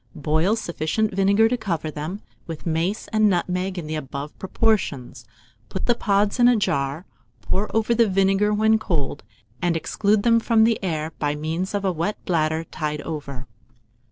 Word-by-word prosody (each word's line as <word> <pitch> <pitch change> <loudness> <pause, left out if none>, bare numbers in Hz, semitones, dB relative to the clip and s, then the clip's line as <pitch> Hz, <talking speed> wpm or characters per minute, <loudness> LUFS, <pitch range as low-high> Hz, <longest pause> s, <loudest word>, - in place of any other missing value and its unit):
Boil 160 +7 +1
sufficient 210 +1 -1
vinegar 200 +3 +4
to 250 +2 0
cover 170 -8 -3
them, 155 +8 -6 0.2
with 165 -2 -7
mace 170 +5 -1
and 215 -1 +3
nutmeg 180 +1 -1
in 170 - -4
the 155 - -4
above 145 -1 -5
proportions; 185 - -1 0.4
put 190 - -4
the 240 - +4
pods 205 0 +1
in 240 - +7
a 245 - +5
jar, 140 -5 -1 0.4
pour 200 +3 -2
over 225 +1 +2
the 230 -2 +3
vinegar 195 +2 +2
when 220 +1 +3
cold, 160 -9 -2 0.4
and 175 -2 +1
exclude 205 +5 +1
them 230 -1 +5
from 225 -1 +3
the 225 -2 +2
air 160 -3 -2
by 145 -1 0
means 165 +6 -3
of 200 -1 -1
a 190 - +2
wet 175 +5 -2
bladder 160 -2 +1
tied 150 -2 -4
over. 140 -5 -6
185 Hz, 170 wpm, -23 LUFS, 155-210 Hz, 0.4 s, in